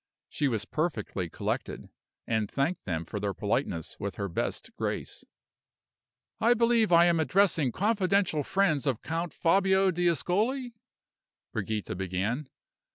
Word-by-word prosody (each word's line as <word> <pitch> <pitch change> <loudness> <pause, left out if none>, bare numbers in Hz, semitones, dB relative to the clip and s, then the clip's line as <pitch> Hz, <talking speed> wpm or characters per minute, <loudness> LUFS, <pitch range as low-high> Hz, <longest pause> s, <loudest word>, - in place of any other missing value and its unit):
She 145 - 0
was 110 -4 -1
perfectly 115 - -2
collected, - - -4 0.4
and 110 -2 0
thanked 150 +6 -1
them 85 -3 -2
for 105 - -5
their 100 -2 -2
politeness 80 -2 -2
with 100 0 -4
her 100 - -3
best 85 - -3
grace. - - -4 1.2
"I 235 +2 +4
believe 230 -3 +3
I 170 0 +7
am 170 -1 +3
addressing 160 -3 +3
confidential 200 - +1
friends 160 -3 +1
of 125 -5 -1
Count 165 +1 -2
Fabio 190 +2 +3
d'Ascoli?" 195 - 0 0.8
Brigida 110 0 -2
began. 95 - -2
160 Hz, 125 wpm, -29 LUFS, -, 1.2 s, I